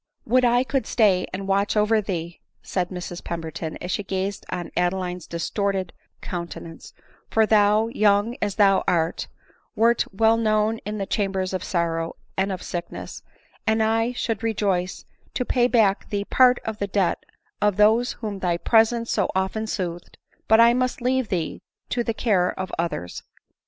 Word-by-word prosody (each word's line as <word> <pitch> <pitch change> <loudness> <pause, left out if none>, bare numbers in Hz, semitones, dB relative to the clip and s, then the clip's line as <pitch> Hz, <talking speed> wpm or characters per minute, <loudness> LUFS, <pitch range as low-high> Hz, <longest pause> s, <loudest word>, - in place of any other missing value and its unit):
" - - -48
Would 255 +3 +3
I 245 +1 +4
could 265 0 -1
stay 200 -6 +3
and 195 +1 -5
watch 200 +2 +1
over 215 +1 +3
thee 170 -4 -5
!" - - -47
said 180 -2 -2
Mrs 180 -1 -6
Pemberton, 165 -1 -5
as 180 - -1
die - - -4
gazed 195 +1 -3
on 180 -2 -4
Adeline's 180 -1 -1
distorted 190 +2 -2 0.3
counte 170 -2 -5
nance; 165 -1 -11 0.2
" - - -33
for 220 0 +3
thou, 210 0 +4
young 210 +1 +2
as 205 -2 -1
thou 195 -2 +4
art, 165 -1 0 0.5
wert 230 +1 +3
well 225 +3 +3
known 215 0 +1
in 210 0 -3
the 195 - -2
chambers 195 -2 -1
of 185 - -2
sorrow 165 -2 -1 0.2
and 195 +1 0
of 185 - -5
sickness; 175 -1 -6 0.5
and 220 0 +3
I 225 +2 +1
should 225 -3 -2
rejoice 195 -5 -1 0.3
to 250 - -1
pay 245 -1 +2
back 220 -6 +2
to - - -22
thee 200 -1 -2
part 250 +1 +5
of 220 -1 -4
the 200 - -1
debt 195 -2 0 0.4
of 210 -2 +2
those 220 +4 +4
whom 210 -4 -5
thy 175 -2 0
presence 230 +4 +2
so 200 - +1
often 190 +4 -1
soothed; 175 -5 -4 0.3
but 220 - +5
I 235 +1 +7
must 255 +1 0
leave 255 -1 0
thee 170 -4 -2 0.3
to 240 - 0
the 230 -1 -2
care 190 -8 +1
of 185 -1 -4
others. 90 - -3
200 Hz, 175 wpm, -24 LUFS, 180-225 Hz, 0.5 s, I